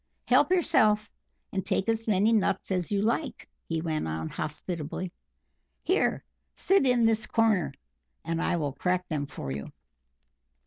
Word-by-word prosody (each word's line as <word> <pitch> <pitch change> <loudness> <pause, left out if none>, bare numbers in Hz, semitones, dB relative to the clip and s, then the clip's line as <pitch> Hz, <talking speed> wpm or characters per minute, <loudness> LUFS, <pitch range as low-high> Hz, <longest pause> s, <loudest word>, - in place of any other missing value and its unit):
Help - - +4
yourself, 225 - +3 0.4
and 190 -1 -1
take 190 +2 -1
as 225 0 0
many 210 +2 +3
nuts 195 -3 +1
as 180 -1 -1
you 200 0 +1
like," 230 +2 -1 0.2
he 165 -1 -1
went 155 - -2
on 80 0 -3
hospitably. 155 +3 -4 0.7
"Here - - +1 0.3
sit 385 -8 +3
in 245 -2 +4
this 225 0 +1
corner, 220 -6 +2 0.5
and 165 0 -1
I - - +1
will 145 -5 -2
crack 180 +5 -1
them 145 -3 -2
for 70 - -6
you." 70 +1 -5
185 Hz, 145 wpm, -28 LUFS, 160-225 Hz, 0.7 s, Help